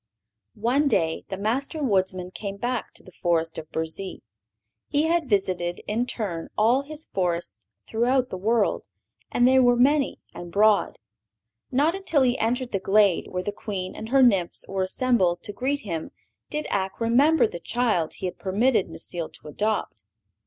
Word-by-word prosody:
One 250 +7 +2
day 165 -10 +1
the 190 - -4
Master 270 - -1
Woodsman 185 -5 0
came 200 0 -6
back 245 +2 -2
to - - -10
the 185 - -14
forest 165 -2 -1
of 155 -1 -11
Burzee. 160 +4 -4 0.6
He 290 +1 +1
had 325 -3 +1
visited, 185 -4 0
in 235 +4 0
turn, 180 -10 -3
all 235 +5 +4
his 305 +2 -5
forests 170 - -2 0.3
throughout 250 +3 +1
the - - -3
world, 215 +3 +1 0.4
and 245 - +4
they 260 +1 +5
were 245 -1 +5
many 275 +3 +2
and 175 -1 -8
broad. 210 +2 +3 0.7
Not 290 +6 +2
until 370 -7 +1
he 250 -1 +2
entered 245 +2 0
the 195 - 0
glade 200 -1 +3
where 180 0 -3
the 205 - -2
Queen 195 -3 -5
and 220 - -7
her 270 +1 +5
nymphs 195 -8 +2
were 195 -1 -2
assembled 185 -4 +1
to 205 - -6
greet 280 +5 -1
him 165 - -4 0.4
did 300 0 -3
Ak 190 -1 -2
remember 265 +8 +4
the 170 - -5
child 215 -5 0
he - - -6
had 180 - -4
permitted 210 +3 +2
Necile 170 -3 -5
to 150 - -11
adopt. 210 - -2
215 Hz, 165 wpm, -25 LUFS, 185-255 Hz, 0.7 s, they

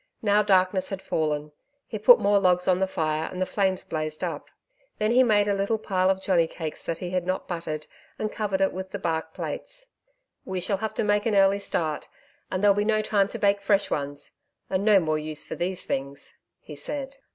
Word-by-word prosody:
Now 205 0 +4
darkness 185 -2 +2
had 195 -2 -4
fallen. 150 -4 -2 0.3
He 215 - -6
put 240 +4 +8
more 200 0 +3
logs 180 -2 +2
on 185 -1 +3
the 190 - +1
fire, 155 -3 -1
and 185 - -6
the 185 - +1
flames 190 -1 0
blazed 155 -1 -4
up. - - -4 0.5
Then 215 +1 +1
he 250 +2 +6
made 210 -4 +4
up 205 - +2
a - - -1
little 200 +3 +1
pile 190 -3 +1
of 190 0 0
johnny 170 -4 +3
cakes 160 -2 -6
that 165 - -2
he 180 -1 -5
had 180 -1 0
not 185 0 -2
buttered, 155 -3 -4 0.3
and 215 -1 -2
covered 200 -3 -2
it 195 - +2
with 190 0 -5
the - - -4
bark 160 -1 -2
plates. - - -6 0.5
'We 190 -1 -3
shall 200 +2 0
have 220 +1 -4
to - - 0
make 205 +1 +2
an 215 - +1
early 195 0 +4
start, 160 -6 -2 0.4
and 185 +1 -2
there'll 205 -1 +7
be 205 +1 0
no 215 0 +2
time 200 -2 +2
to - - -6
bake 200 0 +2
fresh 200 0 +2
ones 145 0 -3 0.4
and 185 +1 +1
no 210 -2 +6
more 155 -3 0
use 155 0 -3
for - - -7
these 180 +1 -3
things,' 140 +1 -4 0.2
he 150 - -10
said. 275 - -6
190 Hz, 220 wpm, -26 LUFS, 165-205 Hz, 0.5 s, put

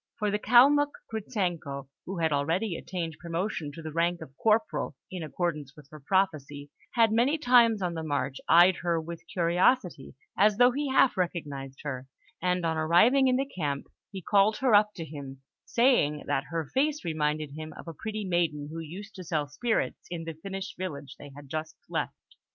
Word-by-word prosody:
For 210 -2 0
the 210 - 0
Kalmuk, 280 +6 +5 0.2
Gritzenko, 175 - -3 0.2
who 190 +1 -4
had 160 -2 +1
already 165 +7 0
attained 165 -3 -5
promotion 170 -2 -3
to 165 - -9
the 155 - -5
rank 170 +2 +1
of 135 - -11
corporal, 220 -8 +1 0.2
in 185 -2 -5
accordance 150 -3 -3
with 150 -3 -15
her 155 - -10
prophecy, 145 -4 -1 0.2
had 225 -2 +5
many 245 +8 +3
times 240 -7 +4
on 175 -1 -1
the 165 - -4
march 140 -3 -2
eyed 175 +2 +7
her 170 -1 0
with 165 +1 -7
curiosity, 175 - +1 0.2
as 205 +1 +4
though 245 +1 +6
he 285 +2 -2
half 265 -4 +4
recognised 145 -7 -3
her; 130 -3 -5 0.3
and 180 -1 0
on 160 -1 0
arriving 215 +13 +4
in 255 - +3
the 270 +2 +1
camp, 150 - -3 0.2
he 190 -3 -8
called 205 +3 +3
her 255 -3 +2
up 210 0 +5
to 165 - -5
him, 140 -3 -9 0.2
saying 230 - +2
that 135 - -1
her 165 -1 -3
face 295 - 0
reminded 155 -2 -1
him 155 +2 -7
of - - -11
a 165 - -6
pretty 215 +5 -5
maiden 165 -5 0
who 165 - -5
used 185 +6 -8
to 185 - -8
sell 155 -3 -1
spirits 225 +11 -2
in 170 -2 -5
the 165 0 -5
Finnish 195 +4 -6
village 145 -7 -5
they 145 - -10
had 145 -1 -11
just 155 +3 -5
left. - - -2
170 Hz, 185 wpm, -28 LUFS, 150-210 Hz, 0.3 s, eyed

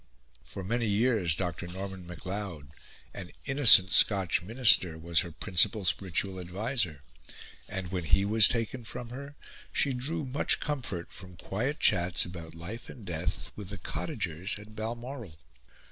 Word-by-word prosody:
For 95 - -8
many 115 +4 -1
years 105 -5 +1
Dr. 90 0 -4
Norman 95 0 -7
Macleod, 90 -3 -6 0.4
an 95 -3 -8 0.2
innocent 130 -9 +8
Scotch 95 -4 +4
minister, 100 -5 +4
was 85 +1 +1
her 85 - -2
principal 95 +6 +1
spiritual 95 +2 -1
adviser; 90 - -1 0.7
and, 95 -2 -5
when 90 -3 -3
he 95 +5 +3
was 110 +1 +6
taken 115 +1 -2
from 120 +1 -8
her, 140 +3 -9 0.4
she 140 - +1
drew 145 +5 -2
much 135 +3 +1
comfort 125 - -4
from 90 -2 -11
quiet 125 - -3
chats 90 -3 +2
about 85 -3 -9
life 95 +8 -8
and 115 - -11
death 85 -3 -4
with 100 -3 -8
the 105 - -6
cottagers 85 +2 -3
at 105 +1 -13
Balmoral. 115 - -6
95 Hz, 145 wpm, -29 LUFS, 90-115 Hz, 0.7 s, innocent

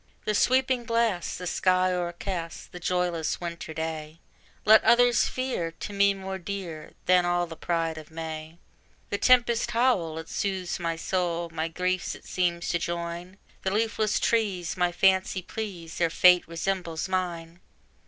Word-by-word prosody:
"The 215 - +1
sweeping 255 +2 +2
blast, 230 -6 0
the 180 - -6
sky 185 +1 +2
o'ercast," 175 -1 -4
The 180 - -8
joyless 175 -3 -1
winter 170 -2 -6
day 160 0 -5 0.5
Let 220 0 +7
others 245 0 +5
fear, 255 -10 -2
to 205 - -7
me 200 0 +4
more 190 0 -5
dear 175 -5 -6
Than 180 -1 +5
all 175 0 +1
the 165 -1 -9
pride 165 -1 -1
of 155 - -13
May: 160 0 -6 0.5
The 200 - -1
tempest's 240 -2 +4
howl, 230 -10 +1
it 160 0 -6
soothes 190 -3 -2
my 165 -1 -1
soul, 170 -1 -1
My 160 0 -1
griefs 180 +2 -1
it - - -15
seems 175 -2 -1
to 170 - +1
join; 170 +2 -4 0.2
The 190 - 0
leafless 215 +1 +1
trees 200 -7 0
my 180 -1 +1
fancy 190 +1 +2
please, 180 -6 -6
Their 170 -1 +3
fate 180 +1 +5
resembles 170 0 -2
mine! 175 -2 -3
180 Hz, 155 wpm, -27 LUFS, 165-195 Hz, 0.5 s, Let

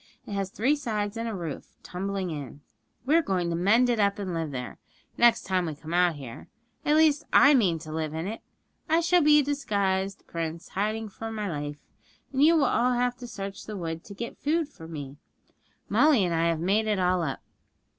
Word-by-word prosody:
It - - -9
has 195 -1 -2
three 250 +9 +1
sides 215 -7 -3
and 230 0 -3
a 220 - -4
roof 165 -6 -6
tumbling 190 0 -3
in. 145 -2 -7 0.4
We're 315 +5 +4
going 180 - -1
to - - 0
mend 210 +8 +4
it 240 -2 +1
up, 200 -1 +2
and 195 -3 -4
live 165 -2 -2
there, 125 -3 -6 0.4
next 235 -1 +4
time 185 -2 0
we 155 - -4
come 160 +3 -8
out 175 -2 +3
here. 130 -5 -9 0.4
At 300 - +3
least, 310 -2 +4
I 285 - +7
mean 195 - +3
to 155 -1 -9
live 155 -1 -3
in 160 +2 -3
it. 220 +3 -5 0.5
I 325 +2 +4
shall 350 +1 +4
be 300 0 +6
a - - -2
disguised 200 -9 -1
prince 165 +1 -5
hiding 215 +2 -2
for 225 +3 -7
my 210 -2 -3
life, 145 -3 -4 0.6
and 265 - +1
you 325 +3 +6
will 300 -4 +4
all 250 0 +2
have 245 0 +1
to 245 -1 -8
search 200 -4 -7
the 210 -1 -5
wood 165 -2 -4
to 200 - -10
get 235 +3 -6
food 320 +1 0
for 160 - -12
me. 145 -4 -7 0.7
Molly 250 -1 +4
and 175 - -1
I 165 0 +2
have 165 -1 0
made 200 +6 +1
it 210 -1 +1
all 180 -1 +2
up. 145 -5 -3
200 Hz, 215 wpm, -27 LUFS, 165-240 Hz, 0.7 s, I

